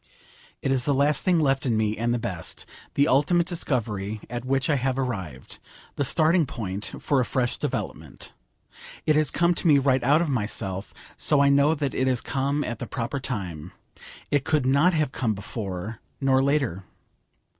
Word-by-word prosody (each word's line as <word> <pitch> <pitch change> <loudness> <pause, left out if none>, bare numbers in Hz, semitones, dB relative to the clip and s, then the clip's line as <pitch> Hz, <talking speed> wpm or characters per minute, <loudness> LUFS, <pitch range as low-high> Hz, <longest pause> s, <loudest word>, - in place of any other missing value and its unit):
It 135 - +1
is 130 -2 +2
the 145 - +2
last 145 +2 +2
thing 180 -2 +3
left 135 -3 +2
in 120 -4 +1
me, 110 0 +1
and 115 +2 -1
the 120 - +1
best: 105 -8 -4 0.3
the 140 +1 +4
ultimate 165 +5 +3
discovery 110 - -2
at 120 0 -4
which 135 0 0
I 150 - +2
have 130 0 -1
arrived, 95 - -4 0.4
the 145 - 0
starting 160 +3 +3
point 100 -4 -5
for 140 - +1
a - - +3
fresh 125 0 0
development. - - -5 0.7
It 155 - +3
has 155 -1 +3
come 170 +1 +2
to 170 - -1
me 150 -3 +7
right 130 -2 +2
out 145 +5 +4
of - - -2
myself, 105 -6 -2 0.3
so 150 - +2
I 140 0 +5
know 140 +3 +4
that 140 -3 -2
it 130 - 0
has 130 -2 +2
come 140 +3 -1
at 120 - -4
the - - -5
proper 120 +2 -3
time. 90 - -5 0.6
It 145 -2 +2
could 150 -3 +1
not 140 +8 +4
have 155 -4 +1
come 115 -7 -1
before, 100 0 -5 0.2
nor 135 -1 +3
later. 135 - 0
130 Hz, 185 wpm, -25 LUFS, 110-145 Hz, 0.7 s, me